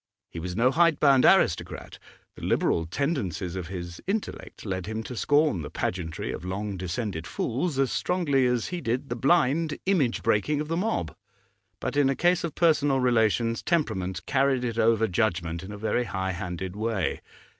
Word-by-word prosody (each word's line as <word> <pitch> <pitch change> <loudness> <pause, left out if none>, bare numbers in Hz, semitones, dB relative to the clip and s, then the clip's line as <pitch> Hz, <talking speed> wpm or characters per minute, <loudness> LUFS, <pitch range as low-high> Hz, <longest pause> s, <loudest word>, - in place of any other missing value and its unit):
He 85 - -6
was 90 +2 -5
no 125 +3 +3
hidebound 145 -4 +4
aristocrat; - - +2 0.4
the - - -12
liberal 80 -1 +1
tendencies 95 - -2
of 90 -3 -4
his 85 -2 -7
intellect 205 - -4
led 95 -2 -3
him 110 +1 -3
to 125 - -7
scorn 145 - +2
the 75 - -6
pageantry 85 -3 -3
of - - -6
long 100 +2 -3
descended 90 -1 -4
fools 135 - -2
as 135 -2 +2
strongly 145 -8 +1
as 125 -2 0
he 180 -1 -4
did 125 +2 -2
the 120 - -2
blind 150 +3 +2
image 160 -11 +1
breaking 145 +8 +1
of 150 0 -4
the 165 - 0
mob; 165 - -1 0.6
but - - -3
in 145 -2 +4
a 135 - +1
case 175 +5 +2
of 170 - -4
personal 145 -5 +3
relations 115 -2 +2
temperament 95 - -1
carried 135 -2 +2
it 115 -2 -2
over 115 0 +3
judgment 85 -4 -1
in 95 +2 -8
a 105 - -7
very 110 +3 0
high 95 -3 -2
handed 90 +1 -5
way. 110 -4 -1
115 Hz, 175 wpm, -26 LUFS, 95-145 Hz, 0.6 s, hidebound